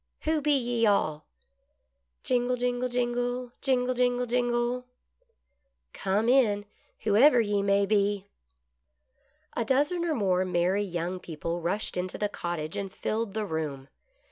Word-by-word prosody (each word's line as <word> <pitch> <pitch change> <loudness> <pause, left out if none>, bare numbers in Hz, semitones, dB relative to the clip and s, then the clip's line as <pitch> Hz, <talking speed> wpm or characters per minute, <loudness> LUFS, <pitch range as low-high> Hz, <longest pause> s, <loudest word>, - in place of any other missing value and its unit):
" - - -52
Who 310 -1 +1
be 290 0 +3
ye 240 -3 +1
all 155 -7 +1 0.5
" 60 0 -50
Jingle., 250 0 +1
jingle, 245 0 -1
jingle. 245 0 -1
Jingle, 255 -2 +1
jingle, 245 0 +1
jiitgle! 245 0 0 0.6
" - - -50
Come 200 +4 0
in, 225 -6 +3 0.4
whoever 235 +6 +5
ye 205 -3 +1
may 200 0 +3
be." 200 -1 +1 1.3
A - - 0
dozen 290 +9 +1
or 330 -3 0
more 185 -5 +2
merry 185 +2 +1
young 175 -1 -3
people 170 +1 -4
rushed 180 +3 -1
into 180 0 -3
the 210 - -1
cottage, 170 -5 -4
and 195 -1 -4
filled 215 +1 -3
the 215 -1 -1
room. 150 -6 -4
215 Hz, 140 wpm, -28 LUFS, 185-245 Hz, 1.3 s, whoever